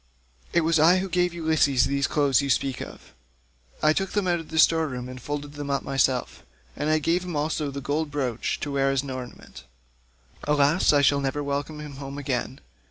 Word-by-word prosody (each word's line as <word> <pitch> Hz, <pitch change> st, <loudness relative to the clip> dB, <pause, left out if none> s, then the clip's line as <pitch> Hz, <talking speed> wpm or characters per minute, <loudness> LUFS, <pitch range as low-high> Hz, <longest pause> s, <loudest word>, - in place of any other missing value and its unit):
It 170 Hz, -, +3 dB
was 165 Hz, 0 st, +2 dB
I 170 Hz, +4 st, +6 dB
who 190 Hz, +1 st, -1 dB
gave 180 Hz, -1 st, +1 dB
Ulysses 160 Hz, -6 st, +2 dB
the 140 Hz, 0 st, -1 dB
clothes 140 Hz, -1 st, +2 dB
you 140 Hz, -, -3 dB
speak 135 Hz, -1 st, 0 dB
of. -, -, -10 dB, 0.7 s
I 155 Hz, 0 st, +5 dB
took 195 Hz, +3 st, -2 dB
them 205 Hz, -3 st, 0 dB
out 175 Hz, -1 st, +1 dB
of 165 Hz, -, -10 dB
the 160 Hz, -, -5 dB
store 160 Hz, 0 st, +4 dB
room 125 Hz, -2 st, -5 dB
and 125 Hz, 0 st, -9 dB
folded 145 Hz, +2 st, -5 dB
them 145 Hz, -1 st, -6 dB
up 140 Hz, -1 st, 0 dB
myself, 135 Hz, -2 st, 0 dB, 0.3 s
and 150 Hz, -, -2 dB
I 155 Hz, -, +4 dB
gave 165 Hz, +4 st, 0 dB
him 180 Hz, -3 st, -5 dB
also 150 Hz, 0 st, -1 dB
the 140 Hz, 0 st, -6 dB
gold 145 Hz, +3 st, -1 dB
brooch 130 Hz, -5 st, -2 dB
to 145 Hz, -, -3 dB
wear 135 Hz, 0 st, +1 dB
as 135 Hz, 0 st, 0 dB
an 140 Hz, -, -6 dB
ornament. 125 Hz, -, -9 dB, 0.8 s
Alas! 150 Hz, +3 st, +3 dB
I 145 Hz, -1 st, +4 dB
shall 140 Hz, 0 st, +4 dB
never 140 Hz, +2 st, -2 dB
welcome 145 Hz, +2 st, -3 dB
him 150 Hz, -2 st, -8 dB
home 140 Hz, 0 st, -7 dB
again. 130 Hz, -2 st, -3 dB
145 Hz, 210 wpm, -25 LUFS, 135-160 Hz, 0.8 s, I